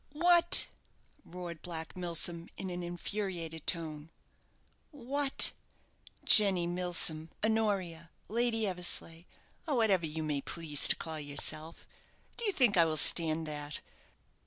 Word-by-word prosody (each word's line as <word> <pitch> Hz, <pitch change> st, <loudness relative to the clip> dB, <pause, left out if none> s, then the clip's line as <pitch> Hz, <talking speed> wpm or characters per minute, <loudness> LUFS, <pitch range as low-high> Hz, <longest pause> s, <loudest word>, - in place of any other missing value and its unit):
"What!" 345 Hz, +2 st, +4 dB, 0.6 s
roared 175 Hz, -2 st, -9 dB
Black 165 Hz, -2 st, -8 dB
Milsom, 170 Hz, -1 st, -2 dB
in 190 Hz, -1 st, -6 dB
an 175 Hz, 0 st, -5 dB
infuriated 175 Hz, -2 st, -6 dB
tone. 160 Hz, -2 st, -3 dB, 0.8 s
"What, 280 Hz, 0 st, +1 dB, 0.7 s
Jenny 195 Hz, -5 st, +5 dB
Milsom, 170 Hz, -2 st, -1 dB, 0.2 s
Honoria, 195 Hz, -7 st, -2 dB, 0.2 s
Lady 225 Hz, 0 st, 0 dB
Eversleigh, 175 Hz, -3 st, -1 dB, 0.4 s
or 295 Hz, -, -1 dB
whatever 200 Hz, -8 st, +1 dB
you 155 Hz, +1 st, -5 dB
may 150 Hz, -2 st, -2 dB
please 155 Hz, -1 st, +2 dB
to -, -, +6 dB
call 160 Hz, -1 st, -7 dB
yourself, 150 Hz, +2 st, -5 dB, 0.5 s
do 470 Hz, -, -4 dB
you 410 Hz, -, +2 dB
think 245 Hz, -, +3 dB
I 170 Hz, -, +6 dB
will 155 Hz, -1 st, -2 dB
stand 160 Hz, +1 st, +6 dB
that? 150 Hz, -1 st, -5 dB
175 Hz, 120 wpm, -31 LUFS, 160-210 Hz, 0.8 s, to